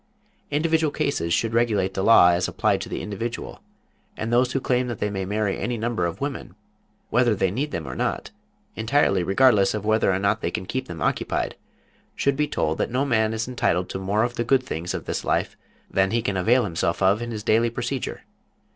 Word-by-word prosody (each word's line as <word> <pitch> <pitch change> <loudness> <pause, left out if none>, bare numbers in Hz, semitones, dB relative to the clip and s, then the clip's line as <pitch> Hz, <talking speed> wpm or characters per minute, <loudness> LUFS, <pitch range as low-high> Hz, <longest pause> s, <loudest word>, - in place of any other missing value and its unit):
Individual 160 +1 +1
cases 140 - -1
should 110 +6 +1
regulate 105 -5 +1
the 95 - -2
law 105 -6 +7
as 85 0 +1
applied - - 0
to - - -6
the - - -4
individual, 110 +3 -5 0.6
and 115 +2 -3
those 125 +1 +3
who 135 - 0
claim 125 -1 0
that 120 -3 -4
they 105 - -2
may 95 -1 -3
marry 105 0 -1
any 115 +4 -2
number 110 -6 -1
of 85 - -6
women, 140 -9 -5 0.6
whether 120 -2 +3
they 95 -2 +1
need 135 +9 -2
them 85 - -5
or 60 - -5
not, - - -2 0.4
entirely 110 -4 +2
regardless 100 +1 +4
of 105 -1 -4
whether 110 -2 +3
or 90 - +1
not 100 +2 0
they - - -1
can 95 - -4
keep 130 +6 -3
them 85 - -5
occupied, - - -1 0.6
should 140 -1 +1
be 150 +1 0
told 80 - -1
that - - 0
no 130 +3 0
man 110 -5 +2
is 110 +1 -2
entitled 90 -8 0
to - - -4
more 100 +3 +1
of 120 0 -3
the 120 - +1
good 130 +2 +2
things 85 -7 -4
of - - -5
this - - -3
life - - 0 0.3
than 95 0 +1
he 115 +1 0
can 100 -4 -1
avail 115 +7 +3
himself 85 -1 -1
of 100 +4 +3
in 120 - -4
his 110 -2 -5
daily 115 +2 +3
procedure. 120 +2 -4
110 Hz, 215 wpm, -24 LUFS, 95-125 Hz, 0.6 s, law